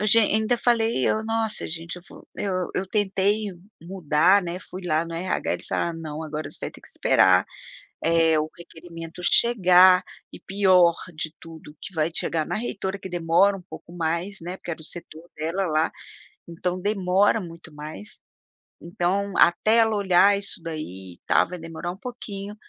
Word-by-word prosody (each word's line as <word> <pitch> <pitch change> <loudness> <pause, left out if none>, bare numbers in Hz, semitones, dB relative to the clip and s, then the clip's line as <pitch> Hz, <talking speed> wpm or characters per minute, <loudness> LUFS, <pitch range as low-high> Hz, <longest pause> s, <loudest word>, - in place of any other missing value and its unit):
O 210 - 0
ge 225 +2 +7
ainda 220 +3 +2
falei: 230 - +2
"Eu, 220 - +1
nossa 225 -1 -2
gente 165 +2 -5
eu 175 - -11
vou" - - -15
Eu 185 -3 -2
eu 190 - -1
tentei 205 +1 +1 0.4
mudar, 180 +1 +3
né, 175 +1 -4
fui 185 0 -10
lá 155 0 +1
no 165 0 -7
RH, 180 +3 -2
eles - - -5
falaram: 170 -1 -2
"Não, 155 -1 -6
agora 155 0 -5
você - - -13
vai - - -4
ter - - -16
que - - -15
esperar, - - +4 0.6
eh, 165 -1 +3
o 155 +1 -2
requerimento 165 0 -10
chegar, 185 -5 +6 0.3
e - - -11
pior 185 -3 +4 0.2
de 155 +1 -5
tudo 160 -2 -12
que 190 - -8
vai 160 +1 0
chegar 160 -2 -1
na - - -3
reitora, 200 -4 -3
que 190 - -8
demora 175 +3 +3
um - - -11
pouco 175 -1 -12
mais, 170 +4 -2
né, 180 +3 -6
porque 175 - -7
era 160 - -6
o - - -11
setor 165 0 -9
dela 165 +5 -2
lá, 155 +1 +1 0.6
então 180 +2 -3
demora 200 +1 +2
muito 165 -2 -10
mais, 155 +7 -8 0.6
então, 190 +3 -1
até 215 +6 +4
ela 220 -1 +4
olhar 200 0 +4
isso 200 -2 -4
daí 95 - -7
e - - -33
tal - - +4
vai 180 0 -7
demorar 165 +1 -6
um - - -8
pouquinho, 205 -4 -7
180 Hz, 180 wpm, -24 LUFS, 165-200 Hz, 0.6 s, ge